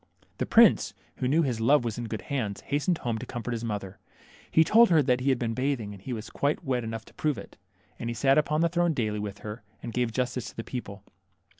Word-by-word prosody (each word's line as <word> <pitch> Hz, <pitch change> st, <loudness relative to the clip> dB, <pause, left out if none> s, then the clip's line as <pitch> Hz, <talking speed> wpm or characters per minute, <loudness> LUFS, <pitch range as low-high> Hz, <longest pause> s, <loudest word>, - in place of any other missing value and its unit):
The -, -, -1 dB
prince, -, -, +5 dB, 0.2 s
who 125 Hz, -, -1 dB
knew 155 Hz, +5 st, +3 dB
his 120 Hz, -6 st, -1 dB
love 135 Hz, +3 st, +4 dB
was 115 Hz, 0 st, -3 dB
in 120 Hz, -, -3 dB
good 110 Hz, -3 st, -5 dB
hands, 115 Hz, -8 st, -3 dB
hastened 145 Hz, +5 st, 0 dB
home 115 Hz, -5 st, -2 dB
to 125 Hz, -, -6 dB
comfort 120 Hz, 0 st, -5 dB
his 115 Hz, -1 st, -3 dB
mother. 100 Hz, -4 st, -4 dB, 0.5 s
He 160 Hz, -, +5 dB
told 225 Hz, +8 st, +6 dB
her 160 Hz, -4 st, +5 dB, 0.2 s
he 130 Hz, +2 st, 0 dB
had 130 Hz, -, +3 dB
been 115 Hz, -2 st, -2 dB
bathing, 130 Hz, -4 st, -1 dB
and 100 Hz, -, -12 dB
he 130 Hz, -, -6 dB
was 115 Hz, -1 st, -5 dB
quite 145 Hz, +2 st, 0 dB
wet 125 Hz, -3 st, -1 dB
enough 115 Hz, 0 st, -5 dB
to -, -, -18 dB
prove 150 Hz, -5 st, -1 dB
it. 100 Hz, -, -10 dB, 0.4 s
And 115 Hz, -, -3 dB
he 120 Hz, -, -3 dB
sat 135 Hz, +5 st, +4 dB
upon 150 Hz, +1 st, +1 dB
the 170 Hz, -, +3 dB
throne 175 Hz, -1 st, +1 dB
daily 110 Hz, -4 st, -1 dB
with 100 Hz, -1 st, -5 dB
her, 105 Hz, +2 st, -6 dB, 0.2 s
and 115 Hz, -, -5 dB
gave 120 Hz, -2 st, 0 dB
justice 125 Hz, -1 st, -2 dB
to -, -, -16 dB
the 115 Hz, -, -5 dB
people. 100 Hz, -6 st, -7 dB
120 Hz, 245 wpm, -28 LUFS, 110-140 Hz, 0.5 s, told